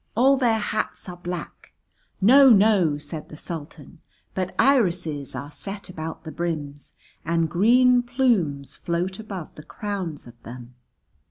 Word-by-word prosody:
All 265 +5 +5
their 240 -4 +2
hats 215 0 -3
are 180 - -7
black 175 -1 -7 0.2
" - - -41
("No, 265 +7 +7
no," 200 -8 +4
said 150 +1 -8
the 150 - -10
Sultan) 155 -3 -8 0.3
"but 185 -1 -3
irises 180 - +1
are 145 +1 -6
set 200 +4 -8
about 160 -2 -7
the 160 - -7
brims, 150 -5 -5 0.3
and 165 0 +1
green 245 +8 +4
plumes 205 - 0
float 180 +3 -3
above 195 -7 -7
the - - -11
crowns 195 -9 -5
of 120 -1 -15
them. 120 +1 -10
180 Hz, 145 wpm, -24 LUFS, 155-220 Hz, 0.3 s, No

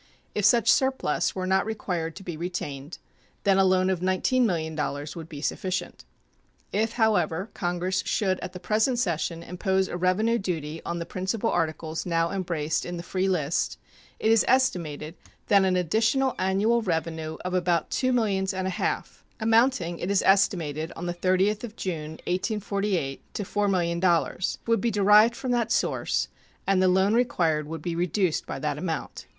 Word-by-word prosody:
If 210 - 0
such 235 -1 +5
surplus 265 - +1
were 185 -1 -2
not 190 +1 +2
required 180 -7 -3
to 195 - -10
be 175 -3 -5
retained, 155 -3 -5 0.5
then 195 -1 +4
a - - +6
loan 185 0 +3
of 185 - -1
$19,000,000 170 - 0
would 165 -1 -8
be 145 -4 -8
sufficient. 185 +3 -3 0.7
If, 220 +2 0
however, 200 -4 +1
Congress 180 0 -1
should 190 -3 0
at 185 - -6
the 180 - -7
present 220 +7 +1
session 170 -5 -1
impose 190 +2 0
a 175 - -4
revenue 210 +6 +2
duty 165 -4 -4
on 170 - -2
the 170 - -4
principal 190 +6 -2
articles 160 0 -2
now 165 -1 +1
embraced 165 -5 -1
in 175 0 -5
the 170 - -6
free 185 +2 -1
list, 160 -4 0 0.4
it 220 - +2
is 225 - +5
estimated 170 - +1 0.4
that 200 -1 +6
an 185 -1 +2
additional 225 - +2
annual 205 +5 +2
revenue 160 -4 -2
of 180 - -2
about 175 -2 +1
two 255 -1 +1
millions 195 -6 +1
and 185 0 -2
a 190 - -1
half, - - -3 0.2
amounting, 225 -6 +2
it 180 - -3
is 200 -1 +2
estimated, 165 -6 +2
on 170 - -6
the 175 - -2
30th 185 +4 +1
of 225 -2 -7
June, 160 -7 -4
1848, 195 - -1
to 205 - -2
$4,000,000, 180 -3 +1
would 230 0 +2
be 235 - +1
derived 210 +2 +5
from 255 0 -3
that 235 -2 +1
source, - - 0 0.4
and 195 -1 +3
the 185 - +4
loan 190 +3 +3
required 165 -11 +1
would 160 -1 -6
be 170 -1 -2
reduced 180 0 0
by - - -4
that - - -2
amount. - - -4
185 Hz, 165 wpm, -26 LUFS, 170-210 Hz, 0.7 s, a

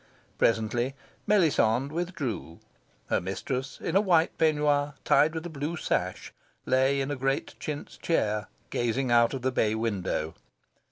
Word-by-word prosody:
Presently 120 +4 +1 0.3
Melisande 140 - +3
withdrew. 155 - -3 0.5
Her - - +2
mistress, 130 +9 -4
in 165 - -3
a 195 - +6
white 170 -5 +3
peignoir 145 -2 +2
tied 150 +3 +4
with 160 +1 -4
a - - -4
blue 155 +2 -4
sash, - - -2 0.3
lay 130 +2 +3
in 135 +1 -1
a - - -1
great 135 +1 -1
chintz 150 -1 -6
chair, 105 -10 0 0.2
gazing 120 +2 0
out 120 +2 +4
of 130 - -6
the 130 - +1
bay 110 -3 +1
window. 95 -8 -2
135 Hz, 145 wpm, -28 LUFS, 115-155 Hz, 0.5 s, a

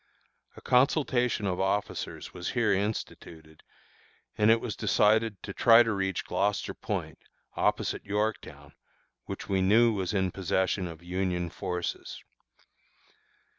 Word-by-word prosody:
A - - -11
consultation 125 -4 +2
of 90 -2 -1
officers 95 +2 -2
was 90 -1 -5
here 120 -5 +2
instituted, 85 -6 -5 0.7
and 105 +1 +3
it 115 +1 +5
was 115 -2 -5
decided 105 0 +2
to 100 - -6
try 115 +2 +6
to 115 -2 -1
reach 95 -2 -2
Gloucester 100 0 -1
Point, - - -5 0.4
opposite - - 0
Yorktown, 105 +2 -3 0.5
which - - -7
we 95 -1 +1
knew 110 +5 +4
was 95 -4 -2
in 95 -3 0
possession 95 0 -1
of 85 0 -10
Union 90 -1 -2
forces. 90 0 -5
100 Hz, 125 wpm, -28 LUFS, 95-110 Hz, 0.7 s, try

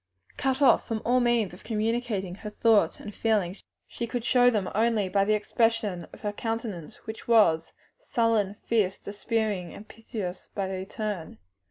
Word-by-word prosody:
Cut 265 +1 0
off 270 - +5
from 225 -1 -1
all 245 +2 +3
other 245 - +3
means 230 -6 +2
of 180 - -13
communicating 220 -4 -1
her 210 +3 -7
thoughts 215 0 +3
and 210 - -8
feelings, 205 -5 0 0.3
she 235 - -5
could 235 0 -3
show 245 -1 +5
them 210 -6 0
only 220 -2 +2
by 195 +1 +3
the 215 +2 +3
expression 210 -4 0
of - - -13
her 210 -1 -2
countenance, 225 -5 -4
which 220 0 -8
was 185 -9 +4 0.3
sullen, 230 - +1
fierce, 205 -5 +1
despairing, 205 -3 -3
piteous 215 -4 -7
by 190 -2 -2
turns. 205 -5 -5
215 Hz, 160 wpm, -27 LUFS, 195-230 Hz, 0.3 s, off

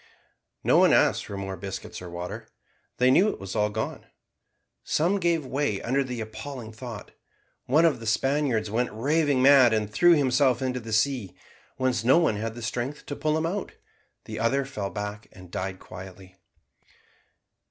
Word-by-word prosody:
No - - +4
one - - +5
asked - - +3
for 100 - -6
more 95 -1 -4
biscuits 100 +3 -7
or 90 - -8
water; 85 +1 -6 0.5
they 125 +1 +4
knew 190 +10 +5
it - - -5
was 95 +1 -7
all 105 -1 +2
gone. 110 +1 -4 0.8
Some 180 +6 +1
gave 170 -4 +1
way 130 -6 -1
under 135 +3 0
the 125 -3 -5
appalling 110 +2 -7
thought. 110 -2 -8 0.6
One 155 +6 +4
of 150 -7 +2
the 115 - -7
Spaniards 125 -2 +1
went 120 +3 0
raving 140 +3 +1
mad, 135 -4 +7
and 110 -1 0
threw 175 0 +6
himself 130 -4 +3
into 130 -1 -2
the 115 -1 -8
sea, 110 -2 0 0.4
whence 130 -2 0
no 130 +6 +5
one 165 -11 +2
had 115 +2 -5
strength 125 +6 -4
to 145 - -5
pull 155 +1 0
him 160 - -1
out; 190 +4 -3 0.5
the - - -6
other 130 +4 +1
fell 105 -7 -4
back 105 +2 -6
and 90 -2 -14
died 95 +1 -4
quietly. 95 0 -11
120 Hz, 170 wpm, -26 LUFS, 105-140 Hz, 0.8 s, mad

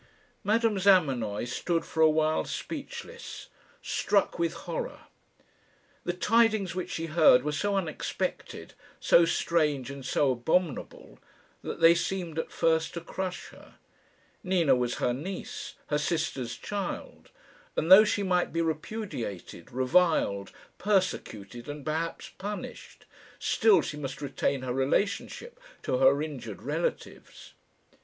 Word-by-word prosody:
Madame 215 0 +2
Zamenoy 135 - +3
stood 165 +7 -1
for 160 - -2
a 160 - +7
while 155 0 +2
speechless 475 0 -7 0.3
struck 200 -3 +1
with 170 -1 +1
horror. - - -4 1.0
The 175 - 0
tidings 215 -1 +2
which 185 0 -4
she 165 - -3
heard 155 -6 +5
were 150 - -1
so 200 +7 -1
unexpected, 170 -6 -3 0.3
so 170 - +5
strange, 150 -6 0
and 140 -1 -8
so 135 +1 +2
abominable, 155 +5 -2 0.4
that - - -6
they 165 +1 +8
seemed 170 -2 -2
at - - -4
first 160 0 +1
to 170 - -4
crush 185 +2 -5
her. - - -17 0.7
Nina 175 -7 +3
was 125 -1 -1
her 120 - 0
niece 180 +9 -6
her 150 0 +1
sister's 145 -7 -2
child; 200 -3 -5 0.5
and 165 - 0
though 195 +3 +11
she 205 -1 0
might 180 -2 +1
be 165 0 0
repudiated, 155 - -5
reviled, 130 - +2 0.3
persecuted, 120 - -1
and 145 -1 -7
perhaps 160 +2 -3
punished, 205 +2 -7 0.3
still 210 -6 +4
she 150 - -5
must 135 -2 -5
retain 140 -1 -1
her 125 -1 -2
relationship 200 - -1 0.2
to 125 - 0
her 135 +2 +5
injured 125 - -7
relatives. - - -4
160 Hz, 125 wpm, -28 LUFS, 135-190 Hz, 1.0 s, though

